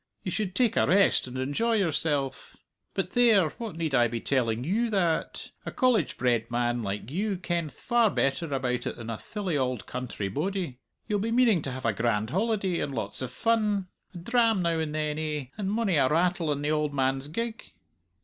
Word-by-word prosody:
You 185 - -3
should 190 -1 -2
take 240 -3 +2
a - - +4
rest 195 -7 +4
and 125 +1 -6
enjoy 145 - 0
yourself. 150 -8 -1 0.4
But - - -1
there! 225 -9 +5
what 225 -7 -5
need 160 -3 -2
I 120 -2 +5
be 115 0 -3
telling 120 -3 0
you 220 - +1
that? 180 -6 -1
A - - -4
College 245 - +2
bred 120 -2 +1
man 120 0 0
like 105 +3 -4
you 200 +4 -1
kenth 170 -4 -2
far 235 -2 +2
better 145 0 0
about 130 -2 -1
it - - -3
than 115 -1 -6
a 115 - -3
thilly 200 -6 -3
auld 130 -3 -1
country 125 -5 -4
bodie! 160 - -3 0.3
You'll 210 -2 0
be 220 +3 -1
meaning 230 -6 +4
to 135 - -4
have 130 0 -6
a 115 - +2
grand 110 0 0
holiday 195 -2 0
and 140 - -3
lots 115 - -3
o' 130 - -2
fun 210 - 0 0.3
a - - -5
dram 225 +1 +2
now 165 -1 +1
and 155 -1 -2
then, 155 0 -1
eh, 150 -3 -2
and 200 -3 -2
mony 210 -6 +1
a 135 - +4
rattle 170 0 +1
in 145 0 -2
the 150 - +1
auld 150 -2 0
man's 135 +1 0
gig?" 230 +8 -4
160 Hz, 200 wpm, -28 LUFS, 130-205 Hz, 0.4 s, there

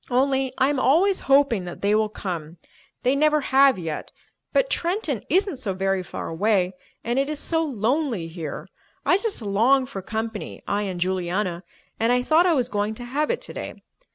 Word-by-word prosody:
"Only 265 +1 +2
I 265 +1 +3
am 290 -2 0
always 355 +10 +3
hoping 270 -9 +4
that 175 - -8
they 205 +1 +3
will 215 0 +2
come. 170 -5 -5 0.5
They 255 +2 +3
never 305 +1 +3
have 270 -2 +4
yet, 160 -4 -5 0.4
but - - +3
Trenton 335 - -1
isn't 370 -1 +2
so 205 -7 -3
very 195 0 0
far 180 - -6
away, 185 +1 +1 0.3
and 240 +3 0
it 275 +1 0
is 305 - -2
so 325 -1 +1
lonely 250 - -1
here. 165 -3 -6 0.4
I 365 - +4
just 420 - -2
long 235 +7 +3
for 200 -7 -7
company—I 220 -1 -4
and 190 -4 -3
Juliana—and 185 +4 -2
I 250 0 +2
thought 325 +6 +4
I 345 - +4
was 250 -4 +1
going 210 -2 -2
to 245 - -8
have 290 +5 -1
it 485 - -1
today. - - -7
240 Hz, 180 wpm, -24 LUFS, 195-280 Hz, 0.5 s, hoping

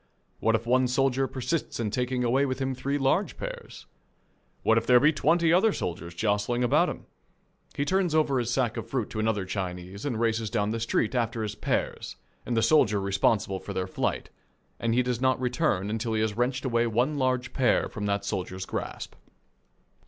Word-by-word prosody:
What 115 0 +2
if 110 +1 -2
one 125 +1 +3
soldier 135 +1 +1
persist 130 +4 -3
in 110 -3 -1
taking 125 +2 -1
away 125 +3 +2
with 130 - -2
him 135 -1 -1
three 135 +3 -2
large 145 +9 +1
pears? - - -7 0.8
What 110 0 +4
if 115 - -11
there 125 -1 +7
be 150 +5 +4
twenty 165 +2 +3
other 195 +5 +4
soldiers 85 - -5
jostling 105 +5 0
about 120 - +3
him? - - -7 0.7
He 140 - -1
turns 185 -1 +1
over 145 -4 +2
his 120 -1 -2
sack 120 -3 0
of - - -5
fruit 125 -5 -2
to 110 - -4
another 110 -3 0
Chinese 95 0 -5
and 125 -6 -2
races 115 -1 0
down 105 +1 0
the 115 - -2
street 115 0 0
after 115 -2 -1
his 105 -1 -3
pears - - -2 0.3
and 120 - -1
the 115 - +3
soldier 105 -10 +4
responsible 100 0 +1
for - - -7
their 95 - -1
flight, 95 - -3 0.5
and 115 0 0
he 125 - +3
does 125 -1 -2
not 130 -1 +2
return 125 - 0
till 115 0 -2
he 110 - +1
has 110 -2 0
wrenched 125 +3 -1
away 120 -2 +2
one 125 +6 0
large 130 -1 0
pear 130 -3 +2
from 105 -1 -5
that 100 0 -1
soldier's 95 -2 -3
grasp. - - -5
120 Hz, 195 wpm, -27 LUFS, 105-130 Hz, 0.8 s, there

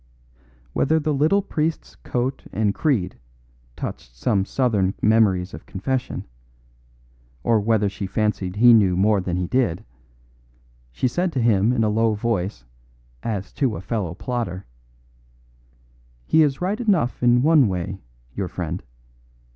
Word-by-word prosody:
Whether 160 +3 +2
the 155 0 -1
little 160 +8 +2
priest's 160 -4 -2
coat 130 +2 -3
and 105 -2 0
creed 115 - 0 0.6
touched - - -7
some 95 - +1
southern 105 -7 +1
memories 100 -4 +2
of - - -10
confession, 125 +7 -3 1.2
or 115 -2 +3
whether 105 0 +2
she 100 0 -4
fancied 100 -2 -1
he 120 +3 +7
knew 95 -5 +4
more 100 +1 +3
than 90 -1 -2
he 90 - -1
did, 115 -4 0 1.1
she 95 - 0
said 175 +8 -1
to 130 - 0
him 115 -2 +3
in 120 -3 +1
a 110 - +2
low 110 +1 +2
voice 105 -3 -2 0.6
as 105 -4 -4
to 130 -7 0
a - - -6
fellow 95 -5 -3
plotter, 110 -6 -4 1.6
"He 160 - +4
is 145 -1 +1
right 200 +6 -1
enough 185 - +1
in 120 0 +4
one 155 -5 +5
way, 95 0 -3 0.3
your 100 -2 -3
friend. 90 -3 -4
110 Hz, 140 wpm, -22 LUFS, 95-130 Hz, 1.6 s, he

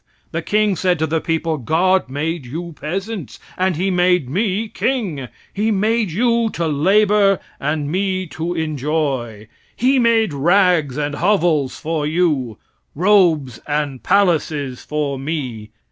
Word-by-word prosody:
The 165 - -2
king 210 +2 +1
said 180 0 +1
to 160 - 0
the 160 +1 -1
people: 165 -1 -1
"God 175 +5 +1
made 155 +3 -3
you 170 +6 -6
peasants, 190 - -5 0.2
and 185 -1 0
He 190 +4 0
made 180 -5 +2
me 205 +4 0
king; 200 - -2 0.3
He 210 +2 0
made 215 +1 +1
you 235 +4 +2
to 165 -1 -1
labor, 195 +6 +3 0.2
and 150 0 -1
me 185 0 -1
to 170 +3 -4
enjoy; 140 -8 -2 0.3
He 260 +2 +2
made 225 -6 +3
rags 170 -2 +2
and 145 0 -2
hovels 165 -5 +1
for 155 -2 -2
you, 150 - 0 0.4
robes 170 - +3
and 145 -3 -2
palaces 160 -9 +1
for 145 -3 -2
me. 130 -7 -4
165 Hz, 135 wpm, -19 LUFS, 145-195 Hz, 0.4 s, labor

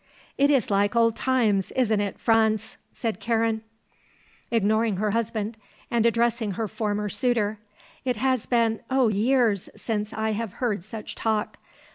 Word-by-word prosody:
"It 280 +1 +3
is 270 -8 +2
like 200 +2 +2
old 230 -1 +4
times, 220 -7 +1
isn't 225 -5 +2
it, 200 -1 -3
Franz?" 220 -1 +2 0.2
said 225 -6 -3
Karen, 225 -1 0 0.9
ignoring 220 -2 +2
her 210 +1 0
husband 225 0 -2 0.3
and 235 -1 +3
addressing 235 -2 +1
her 220 +3 -2
former 210 0 -2
suitor. 220 -2 0 0.4
"It 250 -2 0
has 255 +1 0
been 230 -2 +2
oh, 260 -3 +3
years 220 -1 +2
since 215 -2 -3
I 220 0 -1
have 215 -2 -3
heard 220 -7 -1
such 215 +2 -7
talk. 220 -2 -1
225 Hz, 145 wpm, -25 LUFS, 210-235 Hz, 0.9 s, old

